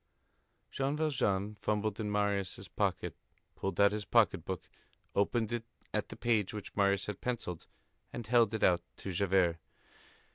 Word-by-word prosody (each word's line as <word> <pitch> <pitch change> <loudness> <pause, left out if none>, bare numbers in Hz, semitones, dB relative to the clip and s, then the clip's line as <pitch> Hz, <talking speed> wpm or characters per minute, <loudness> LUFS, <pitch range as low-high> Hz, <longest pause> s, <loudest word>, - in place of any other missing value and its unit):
Jean 140 +2 0
Valjean 115 -10 +1
fumbled 105 0 0
in 105 -2 -1
Marius' 100 -2 0
coat, - - 0 0.4
pulled 95 - -3
out 100 0 +7
his 105 0 -2
pocket - - +3
book, - - -5 0.5
opened 110 +2 +1
it 120 -1 -1 0.3
at - - -1
the - - -7
page 110 -4 +1
which 105 - -7
Marius 100 -1 +3
had 105 -2 -5
pencilled, 115 -9 -3 0.4
and 120 - -5
held 115 -2 +4
it 110 - -2
out 90 -1 +5 0.2
to 95 - -5
Javert. 90 -2 +3
105 Hz, 150 wpm, -33 LUFS, 100-115 Hz, 0.5 s, out